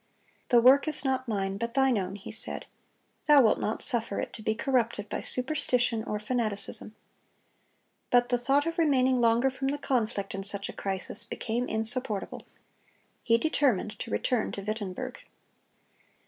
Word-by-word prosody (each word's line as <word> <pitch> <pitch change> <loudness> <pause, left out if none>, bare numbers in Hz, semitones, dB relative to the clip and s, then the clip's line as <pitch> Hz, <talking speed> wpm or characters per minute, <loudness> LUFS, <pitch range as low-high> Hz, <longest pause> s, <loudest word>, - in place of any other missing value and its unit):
"The 240 - +6
work 270 +5 +6
is 305 -2 +1
not 260 -1 0
mine, 195 -3 -2
but 235 +3 -4
Thine 265 -2 +3
own," 195 -1 -2
he 200 - -9
said; - - -2 0.6
"Thou 290 -3 +7
wilt 220 - +3
not 215 - -2
suffer 230 -6 0
it - - -4
to - - -8
be 220 0 0
corrupted 230 -4 0
by - - -3
superstition 250 -4 0
or 210 - -2
fanaticism." 215 -2 -1 1.1
But 245 0 +3
the 245 -1 +1
thought 275 +4 +2
of 335 +1 -3
remaining 260 -5 +3
longer 235 +3 +3
from 270 +1 -3
the 285 +2 -1
conflict 230 -7 -1
in 195 - -4
such 200 0 -2
a - - -6
crisis, 190 -1 -3
became 240 +3 -3
insupportable. 220 -1 -2 0.8
He 230 -1 +3
determined 230 -7 0
to 230 - -6
return 240 +1 0
to 200 - -5
Wittenberg. 205 -3 -4
235 Hz, 160 wpm, -28 LUFS, 210-260 Hz, 1.1 s, Thou